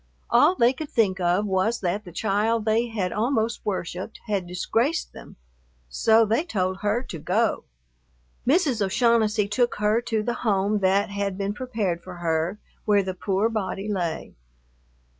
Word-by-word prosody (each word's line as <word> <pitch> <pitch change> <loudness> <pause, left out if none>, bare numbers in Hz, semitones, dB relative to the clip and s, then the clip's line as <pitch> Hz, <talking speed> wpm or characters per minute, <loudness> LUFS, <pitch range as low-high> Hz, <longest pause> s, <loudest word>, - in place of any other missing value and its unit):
All 370 - +5
they 240 -5 +4
could 295 +2 -7
think 195 -5 +1
of 180 +3 +1
was 195 +4 0
that 195 +3 -2
the 175 - -10
child 215 +4 0
they 225 +2 +2
had 205 -6 -2
almost 225 0 0
worshiped 185 +1 -4
had 200 -5 -2
disgraced 230 - -1
them; - - -12 0.5
so 225 - +4
they 225 +8 +1
told 190 - -1
her 210 +5 0
to 165 - -7
go. - - 0 0.8
Mrs. 275 - +2
O'Shaughnessy 220 0 +2
took 240 +4 +1
her 210 +2 +1
to 225 -3 -1
the 240 - -1
home 205 -1 +1
that 200 +2 +2
had 200 -1 -2
been 200 0 -2
prepared 210 -8 -2
for 180 +1 -9
her, 170 +2 -1 0.3
where 205 -2 +3
the 185 0 -3
poor 195 +3 0
body 200 -3 -3
lay. 175 -6 -3
210 Hz, 160 wpm, -25 LUFS, 190-230 Hz, 0.8 s, All